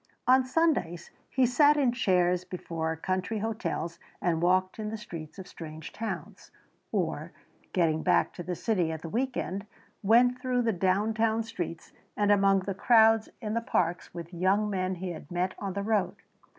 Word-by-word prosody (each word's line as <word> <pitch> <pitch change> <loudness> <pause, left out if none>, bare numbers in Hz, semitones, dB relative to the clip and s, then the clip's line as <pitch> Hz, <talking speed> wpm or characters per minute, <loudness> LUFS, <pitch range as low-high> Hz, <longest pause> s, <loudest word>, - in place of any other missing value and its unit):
On 260 +1 +5
Sundays 255 - 0 0.2
he 260 -1 +3
sat 290 +4 +5
in 270 -4 +3
chairs 180 -6 +2
before 165 -3 -4
country 185 +5 -2
hotels 200 -6 -3 0.2
and 165 -2 0
walked 185 +3 +2
in 210 -1 -3
the 220 - -4
streets 165 -6 -9
of 190 -1 -8
strange 160 -2 -9
towns, 225 +1 -6 0.4
or, - - -2 0.4
getting 160 -3 +2
back - - +2
to - - -7
the 180 +1 -4
city 180 -5 0
at 160 -1 -6
the 165 - -5
week 260 +7 -1
end, 200 +3 -3 0.3
went 245 +4 +4
through 250 -1 +1
the 225 -1 +1
downtown 220 +5 +1
streets 175 -7 -6 0.3
and 205 0 +3
among 195 -1 +4
the 195 +1 -3
crowds 225 +1 +5
in 215 -2 -3
the 230 - 0
parks 175 -7 -1
with 170 0 -8
young 195 +4 +1
men 185 -1 -1
he 180 0 -4
had 155 -3 -9
met 180 +1 -1
on 195 -2 -3
the 200 +1 -3
road. 200 -4 +1
195 Hz, 175 wpm, -29 LUFS, 175-225 Hz, 0.4 s, On